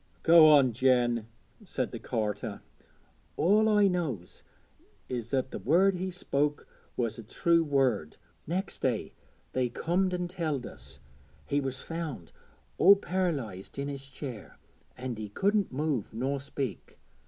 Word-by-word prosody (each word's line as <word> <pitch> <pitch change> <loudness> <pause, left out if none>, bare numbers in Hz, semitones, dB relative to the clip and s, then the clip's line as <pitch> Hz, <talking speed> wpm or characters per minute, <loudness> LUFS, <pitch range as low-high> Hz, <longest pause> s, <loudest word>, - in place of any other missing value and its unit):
'Go 165 -1 +8
on, 140 -4 +6
Jen,' 120 -2 +2 0.4
said 130 - -3
the 115 - -6
carter. 105 -3 -3 0.8
'All 210 +5 +4
I 210 -1 +5
knows 155 - -3 0.7
is 120 -2 -4
that 130 -1 -1
the - - -5
word 185 +7 +4
he 185 +1 -3
spoke 150 -5 -1 0.3
was 115 -2 -1
a - - -7
true 170 +9 +2
word. 130 - +1 0.3
Next 180 +5 -3
day 125 -5 -1 0.4
they 130 -1 +1
comed 180 +8 0
and 180 -1 -2
telled 160 -8 -2
us 65 +2 -10 0.5
he 145 - 0
was 135 -1 -3
found 155 - -6 0.5
all 200 +3 +9
par'lysed 140 - -3
in 140 +1 -2
his 140 -1 -6
chair, 130 -5 -8 0.4
an' 125 -2 -4
he 105 -1 -6
couldn't 200 - +1
move 140 -4 -1
nor 130 +5 -2
speak. 135 - -5
140 Hz, 140 wpm, -29 LUFS, 120-170 Hz, 0.8 s, all